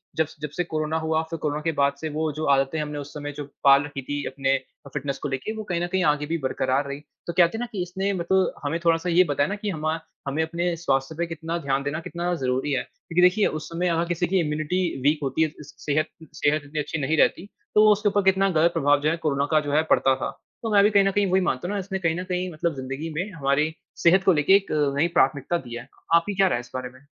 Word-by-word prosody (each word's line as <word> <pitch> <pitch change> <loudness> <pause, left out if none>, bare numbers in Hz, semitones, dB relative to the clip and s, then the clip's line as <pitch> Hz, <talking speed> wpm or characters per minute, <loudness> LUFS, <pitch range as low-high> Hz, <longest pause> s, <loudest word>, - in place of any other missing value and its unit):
जब 160 - +2
स - - -15
जब 150 - -3
से 175 - -1
कोरोना 155 -1 -2
हुआ 160 0 0
फ़िर 165 - -4
कोरोना 150 0 -2
के 165 - 0
बाद 140 0 +3
से 160 - -3
वो 155 +1 -1
जो 155 +2 -3
आदतें 135 +3 +1
हमने 150 -1 -4
उस 145 0 -8
समय 145 -1 -5
जो 145 - -4 0.2
पाल 140 0 +7
रखी 145 -1 -6
थी 145 +2 -4
अपने 135 0 0
अ, 140 - -9
फ़िटनेस 140 -1 -3
को - - -1
लेके 135 +11 -3
वो 215 - -5
कहीं 175 -5 -2
न 175 - 0
कहीं 190 +1 0
आगे 150 -1 +2
भी 165 +3 -1
बरकरार 130 +2 0
रही 140 +1 -5 0.3
तो 170 - -2
कहते 175 +4 +3
हैं - - -5
ना 245 - -2
कि 195 - -3
इसने 190 +3 -2
मतलब 190 +1 +1
हमे 165 - -1
थोड़ा-सा 165 +1 +2
ये 175 +2 +5
बताया 145 -4 0
ना 205 - -2
कि 210 0 -4
हम 155 -5 -5
अ, 165 - -4 0.3
हमें 140 +3 0
अपने 170 +2 -1
स्वास्थ्य 135 -2 -1
पे 170 - 0
कितना 165 +1 -4
ध्यान 135 0 +1
देना 145 +3 -2
कितना 175 +1 -3
ज़रूरी 130 0 -1
है। 135 - +1
क्योंकि 175 +1 -3
देखिए, 180 +4 +5
उस 155 -1 -5
समय 175 +2 -1
अगर 170 0 +1
किसी 175 +1 0
की 190 +1 +2
इम्यूनिटी 155 +2 -1 0.2
वीक 145 +3 +2
होती 135 +3 -1
है, - - +2
इस 150 - -11
स - - -14
सेहत 155 +1 +1 0.3
सेहत 150 +1 +1
इतनी 150 +2 -4
अच्छी 155 +2 -3
नहीं 155 +4 0
रहती 170 - +3 0.3
तो 215 0 +7
उसके 210 0 +2
ऊपर 205 0 +2
कितना 195 +1 +1
ग़लत 170 0 +3
प्रभाव 145 +1 +3
जो 150 - +2
है 165 - 0
कोरोना 140 -1 +1
का 155 - +5
जो - - -1
है 155 +2 +4
पड़ता 135 0 +4
था। 130 - -3 0.3
तो 225 - -2
मैं 200 -1 +6
भी 205 - +5
कहीं 200 -2 +4
न 195 - +2
कहीं 205 0 +1
वही 190 +1 +4
मानता 155 -3 -1
हूँ 200 - -3
ना - - -1
इसने 190 0 -4
कहीं 165 -2 0
न - - -3
कहीं 180 0 -2
मतलब 155 0 -1
ज़िंदगी 135 +4 -5
में 185 +6 -2
हमारी 150 0 +1 0.3
सेहत 185 +3 +5
को 190 - +5
लेके 150 +5 +4
एक 200 0 +1 0.3
नई 160 +4 +3
प्राथमिकता 150 +4 +2
दी 120 - -6
है। 120 +3 -8 0.3
आपकी 170 +5 +2
क्या 195 0 +4
राय 180 - +1
है 120 - -4
इस 125 - -16
बारे 130 -1 -4
में? 130 +2 -19
160 Hz, 275 wpm, -24 LUFS, 145-180 Hz, 0.3 s, पाल